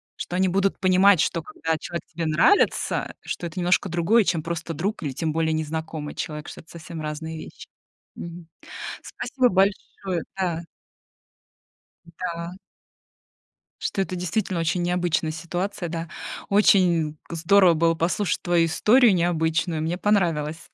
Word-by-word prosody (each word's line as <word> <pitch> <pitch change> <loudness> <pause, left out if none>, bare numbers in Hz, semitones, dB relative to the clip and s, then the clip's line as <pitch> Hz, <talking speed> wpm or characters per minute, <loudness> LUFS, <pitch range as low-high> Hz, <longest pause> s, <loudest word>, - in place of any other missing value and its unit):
что 175 - -5
они 190 - +3
будут 195 +2 +1
понимать, 185 0 +5
что, 165 +2 +1
когда 160 +1 -3
человек 170 +2 -6
тебе 165 0 -4
нравится, 160 - +2
что 175 - -4
это 170 +2 -7
немножко 180 +2 +2
другое, 175 +7 +3
чем 170 -4 0
просто 165 0 -4
друг 190 +5 -3
или, 145 - -2
тем 155 +4 -2
более, 160 0 +1
незнакомый 155 -1 -4
человек. 150 -1 -5
Что - - -9
это 160 - -25
совсем 165 -1 -8
разные 160 +1 -5
вещи. - - -10 0.5
Мгм. 170 0 -8 0.6
Спасибо 255 -2 0
большое, 190 -2 0
да. 175 -3 -1 1.4
М-да. 170 0 -5 1.3
Что 195 - -1
это 185 -1 -3
действительно 180 0 -1
очень 165 +2 0
необычная 175 -2 0
ситуация. 175 +3 -4
Да, 165 0 -4 0.4
очень 175 -6 +4
к 170 - -6
здорово 180 +1 +5
было 165 +1 +2
послушать 175 +4 0
твою 175 -2 +3
историю 220 +8 +5
необычную, 170 -1 0
мне 165 +3 -1
понравилось. 165 -6 0
170 Hz, 140 wpm, -24 LUFS, 160-185 Hz, 1.4 s, понимать